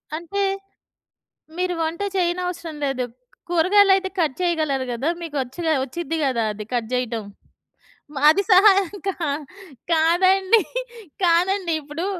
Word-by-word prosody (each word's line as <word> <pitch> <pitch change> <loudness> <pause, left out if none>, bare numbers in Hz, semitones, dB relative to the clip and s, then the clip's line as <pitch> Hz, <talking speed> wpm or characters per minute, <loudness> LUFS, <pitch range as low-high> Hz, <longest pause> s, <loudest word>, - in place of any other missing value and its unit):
అంటే 345 +5 -4 1.2
మీరు 365 0 0
వంట 325 +3 -3 0.2
చేయనవసరం 350 -2 -2
లేదు. 270 -2 -1 0.5
కూరగాయలయితే 385 +2 +4
కట్ 310 -5 +1
చేయగలరు 310 -7 0
గదా. 260 +7 -1
మీకొచ్చుగ 295 0 -4 0.2
ఒచ్చిద్ది 325 +4 -4
గదా 250 -4 0
అది 210 0 -7
కట్ 235 -2 -1
జెయటం? 235 -3 -2 1.0
అది 315 +6 +5
సహాయం 390 0 +5
కా 390 - 0 0.8
కాదండి. 370 +6 +4 0.6
కాదండీ. 355 +1 +2
ఇప్పుడు 300 +5 -5
335 Hz, 105 wpm, -22 LUFS, 280-370 Hz, 1.2 s, అది